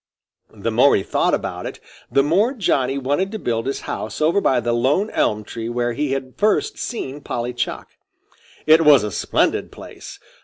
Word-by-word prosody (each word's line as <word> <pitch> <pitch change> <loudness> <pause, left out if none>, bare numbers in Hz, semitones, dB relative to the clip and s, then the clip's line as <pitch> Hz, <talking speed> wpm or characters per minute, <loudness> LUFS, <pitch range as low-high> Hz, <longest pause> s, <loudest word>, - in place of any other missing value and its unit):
The 110 +2 -3
more 125 +5 +5
he 95 - 0
thought - - +1
about - - -5
it, - - -8 0.3
the 140 - +4
more 195 - +2
Johnny 140 - 0
wanted 145 +9 -1
to - - -2
build 115 - -2
his 135 - -3
house - - -5
over 165 +6 +2
by 130 -8 +2
the 120 0 -1
lone 140 - +1
elm 105 0 0
tree 115 +2 -6
where 120 0 -1
he 145 +1 -1
had 130 -1 -4
first 215 - +1
seen 145 - -5
Polly 120 -2 -4
Chuck. 120 - -4 0.8
It 160 +1 +6
was 145 -7 +6
a 105 - -3
splendid - - 0
place. - - -11
135 Hz, 185 wpm, -21 LUFS, 120-160 Hz, 0.8 s, It